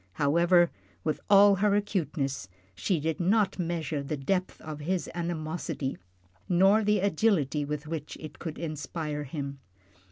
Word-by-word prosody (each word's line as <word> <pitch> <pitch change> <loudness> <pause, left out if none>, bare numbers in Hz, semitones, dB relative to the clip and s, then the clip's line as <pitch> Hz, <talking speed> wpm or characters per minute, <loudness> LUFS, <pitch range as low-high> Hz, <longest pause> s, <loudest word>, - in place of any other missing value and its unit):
However, 170 - +4 0.3
with 155 - -1
all 200 0 +7
her 205 +1 +3
acuteness, 150 - -1 0.2
she 150 - 0
did 160 +1 -2
not 195 +2 +2
measure 165 -4 -2
the 145 +2 -3
depth 185 +7 -1
of 155 -1 -7
his 175 +4 -1
animosity, 160 -4 -3 0.5
nor 195 +5 +5
the 210 -1 +2
agility 165 -7 +2
with 150 +1 -4
which 155 -2 -5
it 155 - -9
could 165 -3 -5
inspire 155 -1 -4
him. 140 0 -5
165 Hz, 135 wpm, -28 LUFS, 150-185 Hz, 0.5 s, all